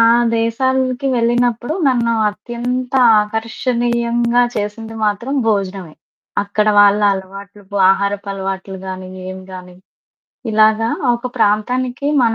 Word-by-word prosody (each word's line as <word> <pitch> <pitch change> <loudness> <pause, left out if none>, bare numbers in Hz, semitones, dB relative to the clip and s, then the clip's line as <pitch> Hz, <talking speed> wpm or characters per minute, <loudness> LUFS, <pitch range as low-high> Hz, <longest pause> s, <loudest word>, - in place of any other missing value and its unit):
ఆ - - +6 0.4
దేశాలకి 255 +3 0
వెళ్ళినప్పుడు, 240 +3 0
నన్ను 235 -3 +1 0.2
అత్యంత 245 +4 -4 0.3
ఆకర్షణీయంగా 235 +2 0
చేసింది 215 +2 -4
మాత్రం 215 +6 -1
భోజనమే. 195 -6 -2 0.5
అక్కడ 205 +1 -1
వాళ్ళ 205 0 +5
అలవాట్లు, 195 +2 -9
బు 205 - -4
ఆహారపు 200 +1 -1
అలవాట్లు 190 0 -5
గానీ, 185 0 -6 0.2
ఏం 185 - -7
గాని, 180 -1 -10 0.8
ఇలాగ 215 0 +4 0.3
ఒక 240 +1 -5
ప్రాంతానికి 245 +5 0 0.2
మన 230 -1 +2
220 Hz, 105 wpm, -17 LUFS, 200-240 Hz, 0.8 s, ఆ